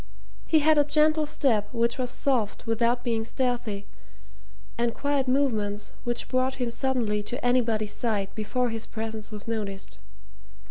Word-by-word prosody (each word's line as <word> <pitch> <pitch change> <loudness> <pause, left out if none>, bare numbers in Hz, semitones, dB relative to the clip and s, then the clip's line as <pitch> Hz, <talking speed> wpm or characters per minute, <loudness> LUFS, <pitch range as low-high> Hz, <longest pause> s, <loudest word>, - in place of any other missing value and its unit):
He 315 -2 +4
had 310 0 +5
a - - +6
gentle 305 +1 +3
step 245 -9 +1
which 235 +1 0
was 250 -1 -1
soft 245 -5 -1
without 235 +2 +1
being 230 -2 0
stealthy, 235 -4 -2 0.9
and 235 0 0
quiet 285 -2 0
movements 215 -7 0
which 240 0 -1
brought 255 +1 +1
him 245 -2 -2
suddenly 235 -5 0
to 245 +6 -4
anybody's 230 -4 +2
side 210 -5 -1
before 245 +3 -1
his 225 0 -4
presence 220 -1 -5
was 210 -1 -7
noticed. 205 -4 -4
235 Hz, 145 wpm, -27 LUFS, 215-260 Hz, 0.9 s, a